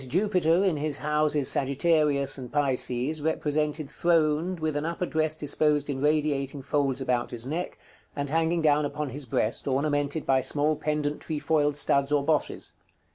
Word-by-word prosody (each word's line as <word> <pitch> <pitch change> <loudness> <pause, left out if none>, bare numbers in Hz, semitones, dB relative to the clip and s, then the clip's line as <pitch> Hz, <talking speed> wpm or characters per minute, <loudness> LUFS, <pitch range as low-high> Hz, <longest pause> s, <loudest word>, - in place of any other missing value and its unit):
_ 130 - -7
Jupiter, 180 +1 +2
in 185 -6 +1
his 145 -1 -2
houses 150 -2 +1
Sagittarius 140 0 +2
and 130 -3 -8
Pisces, 135 +1 -1
represented 150 -1 -1
throned, 165 +2 +1
with 155 -1 -2
an 145 - -1
upper 170 +2 -2
dress 155 -2 0
disposed 150 -1 +1
in 135 -1 -4
radiating 145 -2 0
folds 140 -2 0
about 125 -2 0
his 120 0 -5
neck, 165 +6 -4 0.4
and 145 0 -2
hanging 165 +2 0
down 150 -1 +3
upon 145 0 -3
his 135 +1 -6
breast, 110 +2 0
ornamented 145 +2 0
by 130 -1 +3
small 150 +3 +1
pendent 150 -1 -2
trefoiled 150 -1 0
studs 140 -1 +1
or 145 -1 +2
bosses. 155 -1 -1
150 Hz, 160 wpm, -27 LUFS, 140-155 Hz, 0.4 s, down